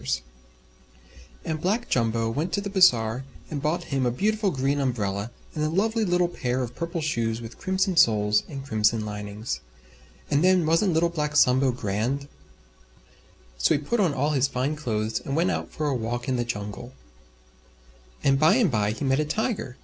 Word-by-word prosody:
And 155 -1 -3
Black 215 +7 0
Jumbo 115 -1 +1
went 150 +8 -2
to 200 - +1
the 200 -1 -5
Bazaar 125 - +4 0.3
and 145 -2 -3
bought 160 +4 0
him 135 -1 +1
a 125 - +2
beautiful 210 - 0
Green 140 -2 0
Umbrella 105 -6 -1 0.2
and 150 - -2
a 155 - +1
lovely 220 +6 +1
little 175 -2 +2
Pair 130 -6 -2
of 120 0 -6
Purple 170 +2 -4
Shoes 115 -7 -1
with 115 0 -10
Crimson 190 0 0
Soles 105 -7 +4
and 135 -2 -7
Crimson 110 -3 +1
Linings. 105 +2 -5 0.7
And 145 +3 +3
then 185 -2 +4
wasn't 165 +4 +2
Little 165 +2 +2
Black 150 -3 -2
Sambo 130 -1 +4
grand? 120 +5 -2 1.3
So - - +3
he - - 0
put 225 +11 -1
on 185 -6 +3
all 145 +3 +1
his 140 -2 +2
Fine 135 +3 -1
Clothes 110 -6 -2
and 135 - -4
went 170 +3 +2
out - - -3
for 155 - -3
a 140 - 0
walk 120 +1 -3
in 130 - +1
the 120 -1 -1
Jungle. 105 +2 -6 1.3
And 135 -1 +3
by 155 +6 +5
and 230 - +3
by 105 -2 +1
he 140 - -4
met 135 +1 +2
a 155 - +1
Tiger. 210 - -2
135 Hz, 180 wpm, -25 LUFS, 115-170 Hz, 1.3 s, by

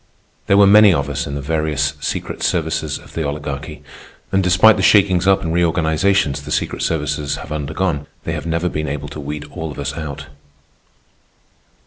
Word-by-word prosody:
There 100 - +4
were 100 - +7
many 105 +1 +7
of 70 - -2
us - - -3
in 70 - -5
the 70 - -5
various 75 -1 0
secret 70 - -4
services 80 -3 -1
of - - -16
the 80 - -2
Oligarchy, 75 +1 -5 0.5
and 95 0 +2
despite 90 +5 +6
the - - -1
shakings 95 -3 +4
up 95 -1 +4
and 80 -1 -2
reorganizations 80 0 +1
the - - -10
secret - - -2
services 75 -2 -1
have 75 - -9
undergone, 75 +1 -2 0.2
they - - -3
have - - -5
never 85 +2 0
been 75 -2 -3
able 70 +1 -4
to 75 - -8
weed 75 +1 -5
all 80 -2 -5
of 70 - -10
us 70 0 -3
out. 75 -2 -6
80 Hz, 180 wpm, -19 LUFS, 75-90 Hz, 0.5 s, were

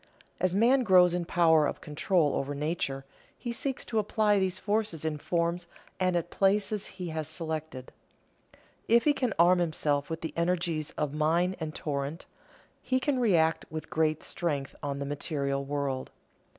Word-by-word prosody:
As 185 0 +1
man 245 +6 +4
grows 180 -5 +5
in 175 -1 -1
power 160 -3 +4
of - - -4
control 150 0 +1
over 140 +1 -2
nature, 140 -3 -2 0.3
he 240 - -4
seeks 260 +3 -2
to 225 - 0
apply 210 0 +2
these 190 -1 0
forces 205 -5 -1
in 155 -1 -2
forms 170 +2 -1 0.3
and 185 -1 +1
at 175 0 -1
places 200 +1 +1
he 180 -2 -4
has 160 -1 -3
selected. 160 -6 -4 1.0
If 235 +1 +5
he 295 - +4
can 255 -4 -1
arm 175 +2 +5
himself 150 -4 0
with 160 0 -4
the 160 - -5
energies 170 -3 0
of 150 -2 -1
mine 165 +5 +1
and 155 -1 -5
torrent, 145 +2 -3 0.6
he 255 0 0
can 270 -1 0
react 165 -9 +2
with 155 0 -7
giant 155 -1 +1
strength 145 -5 -2
on 140 -1 -3
the 140 - -3
material 140 -1 -2
world. 140 -2 -3
165 Hz, 165 wpm, -29 LUFS, 150-190 Hz, 1.0 s, grows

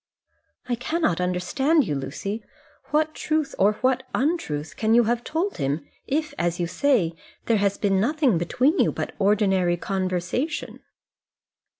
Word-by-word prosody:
"I 250 - -1
cannot 245 - 0
understand 265 - +1
you, 155 - -2
Lucy. 155 +11 -4 0.4
What 310 +1 +1
truth 310 -2 -1
or 205 +2 +5
what 260 0 +3
untruth 245 - -1
can 220 +1 +2
you 240 - +6
have 235 +1 0
told 340 +6 -2
him 140 +2 -1 0.2
if, 310 +2 -1
as 175 0 0
you 175 - +1
say, 195 - +1 0.3
there 230 - +3
has 200 0 +1
been 195 -2 +2
nothing 260 - +2
between 255 - +1
you - - +4
but - - -4
ordinary 195 -4 +2
conversation?" 190 - -2
215 Hz, 140 wpm, -24 LUFS, 180-285 Hz, 0.4 s, you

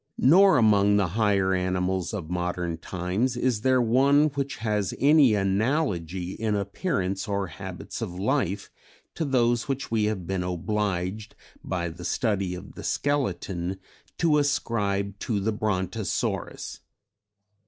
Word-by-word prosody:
Nor 185 +4 +6
among 105 -3 +4
the 100 -4 +1
higher 100 -1 +2
animals 90 0 -1
of 95 -7 -5
modern 90 -1 -2
times 95 +9 -2
is 125 -4 0
there 130 +1 +3
one 140 +6 +4
which 140 -1 -3
has 105 -4 -1
any 140 -5 +5
analogy 95 - 0
in 110 +1 -1
appearance 100 - -2
or 100 -1 -1
habits 95 +5 -8
of 90 -6 -4
life 100 -2 -1 0.4
to 165 - -2
those 120 -2 +1
which 135 -2 -3
we 110 -2 +2
have 105 -5 -2
been 95 +1 -2
obliged 95 +2 -2 0.3
by 85 -2 -2
the 85 +2 -10
study 100 -2 0
of 90 - -10
the - - -9
skeleton 95 -10 -1 0.4
to 160 -3 +3
ascribe 100 -8 -1
to 110 -4 -1
the 105 +3 0
Brontosaurus. 105 -1 -2
100 Hz, 130 wpm, -26 LUFS, 95-125 Hz, 0.4 s, Nor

